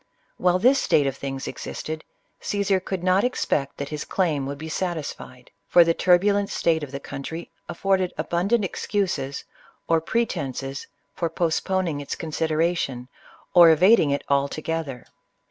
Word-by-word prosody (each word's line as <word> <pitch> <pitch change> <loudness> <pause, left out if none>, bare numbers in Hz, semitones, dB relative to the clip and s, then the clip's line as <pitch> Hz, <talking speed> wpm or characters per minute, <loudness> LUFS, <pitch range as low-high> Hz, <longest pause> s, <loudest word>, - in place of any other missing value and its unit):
While 180 0 +3
this 255 +8 +4
state 145 - +3
of 135 -1 -1
things 135 -1 -5
existed, 155 0 -6 0.4
Caesar 200 -2 0
could 185 -1 -5
not 185 +2 +3
expect 150 - -1
that 140 - -5
his 150 -1 -4
claim 155 -8 0
would 140 0 -5
be 160 +2 -7
satisfied; 155 -7 -5 0.2
for 175 - +7
the 165 0 +2
turbulent 200 +4 +3
state 160 -1 +1
of 145 -3 -6
the 140 - -5
country 160 +5 -7 0.2
afforded 190 0 0
abundant 185 +8 +1
excuses, 185 -8 -2 0.4
or 165 -1 +3
pretences, 140 - -2 0.3
for 170 - -2
postponing 170 -1 -1
its 140 - -4
consideration, 160 -5 -1 0.4
or 175 -2 +9
evading 165 +1 +5
it 140 0 -1
alto 140 +1 +1
gether. 160 -6 -4
165 Hz, 145 wpm, -24 LUFS, 140-185 Hz, 0.4 s, or